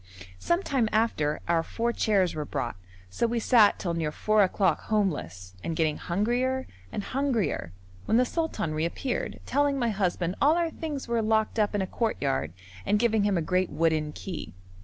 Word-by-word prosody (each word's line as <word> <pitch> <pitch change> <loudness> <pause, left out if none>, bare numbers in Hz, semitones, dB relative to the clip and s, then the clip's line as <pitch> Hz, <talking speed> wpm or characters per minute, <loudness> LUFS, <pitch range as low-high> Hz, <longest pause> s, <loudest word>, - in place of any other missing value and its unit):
Some 345 +3 +1
time 255 - +1
after, 155 -9 +1
our 170 -1 +3
four 235 +7 -2
chairs 195 -6 +2
were 155 - -3
brought, 120 -5 -3 0.4
so 235 - +1
we 235 +1 -1
sat 220 -3 +5
till 175 -3 -2
near 160 -2 -1
four 215 +6 +2
o'clock 195 0 +2
homeless, 120 - -1
and 165 - -2
getting 155 -2 +1
hungrier 245 +8 0 0.3
and 205 - -3
hungrier, 240 - -1 0.3
when 225 - +3
the 250 - +4
sultan 320 - -2
reappeared, 170 - -2
telling 285 +1 +1
my 240 -3 +1
husband 185 -3 -1
all 300 +3 +5
our 335 -1 0
things 300 -6 -5
were 235 -1 +1
locked 220 0 +1
up 210 0 +1
in 200 - +1
a - - -1
courtyard 140 - -1 0.3
and 210 - +2
giving 220 -2 +2
him 200 -3 +2
a 165 - 0
great 185 +2 +1
wooden 160 -2 +1
key. 175 - -7
210 Hz, 180 wpm, -27 LUFS, 165-240 Hz, 0.4 s, sat